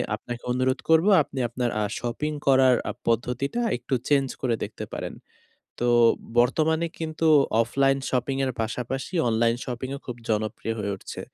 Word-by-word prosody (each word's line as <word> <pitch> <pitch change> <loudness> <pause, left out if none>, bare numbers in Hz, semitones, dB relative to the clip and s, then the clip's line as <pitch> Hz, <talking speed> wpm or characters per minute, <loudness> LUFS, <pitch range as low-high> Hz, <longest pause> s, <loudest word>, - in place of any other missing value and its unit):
আপনাকে 120 +2 -8
অনুরোধ 130 +1 +1
করব, 160 +3 +5 0.2
আপনি 135 - -7
আপনার 120 0 -1
আ - - +1 0.2
শপিং 125 +6 -2 0.2
করার 130 -2 +6
আ - - 0 0.2
পদ্ধতিটা 125 - 0 0.2
একটু 135 - -5
চেঞ্জ 140 -2 +3
করে 120 -3 +1
দেখতে - - -6
পারেন। - - -5 0.7
তো 120 - +2 0.5
বর্তমানে 160 +7 +3
কিন্তু 160 0 -2 0.4
অফলাইন 135 +3 +2
শপিংয়ের 135 +1 0
পাশাপাশি 125 - -3
অনলাইন 115 +1 +2
শপিংও 130 +2 -5
খুব 125 - -5
জনপ্রিয় 110 +1 -1
হয়ে 100 -1 -2
উঠছে। - - -8
130 Hz, 145 wpm, -25 LUFS, 120-140 Hz, 0.7 s, করার